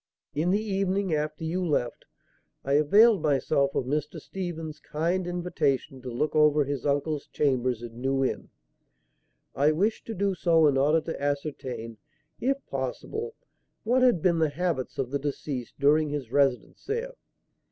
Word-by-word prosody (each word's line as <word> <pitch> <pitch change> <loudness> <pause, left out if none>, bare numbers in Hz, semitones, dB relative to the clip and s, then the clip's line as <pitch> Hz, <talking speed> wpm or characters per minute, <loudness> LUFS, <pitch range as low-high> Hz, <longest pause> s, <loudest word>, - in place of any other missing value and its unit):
In 155 +4 0
the 200 +3 +3
evening, 195 -3 0
after 150 +1 -2
you 175 +3 -1
left, 145 -8 -1 0.6
I 140 - 0
availed 200 +9 +5
myself 140 -1 +1
of - - 0
Mr. 150 +2 -2
Stephen's 165 -5 -6
kind 170 +5 -1
invitation 155 -6 -1
to 125 - -6
look 140 +7 -1
over 150 -1 +5
his 140 -1 -3
uncle's 145 +1 -1
chambers 130 -4 0
in 120 0 -9
New 135 0 +1
Inn. - - -3 1.0
I 145 +2 +3
wished 200 +8 0
to 225 - -4
do 200 +1 +1
so 165 -3 +3
in 145 -2 +4
order 150 +4 +3
to 165 -2 -6
ascertain, 135 -6 -3 0.4
if 275 +2 -1
possible, 435 - -4 0.5
what 245 +4 +2
had 245 -10 +4
been 170 -3 +3
the 160 -1 +3
habits 155 -3 -2
of 130 -2 -2
the 140 - 0
deceased 140 -3 -4
during 150 +2 +3
his 140 -5 -4
residence 135 -2 +1
there. 470 +4 -3
150 Hz, 155 wpm, -27 LUFS, 140-180 Hz, 1.0 s, availed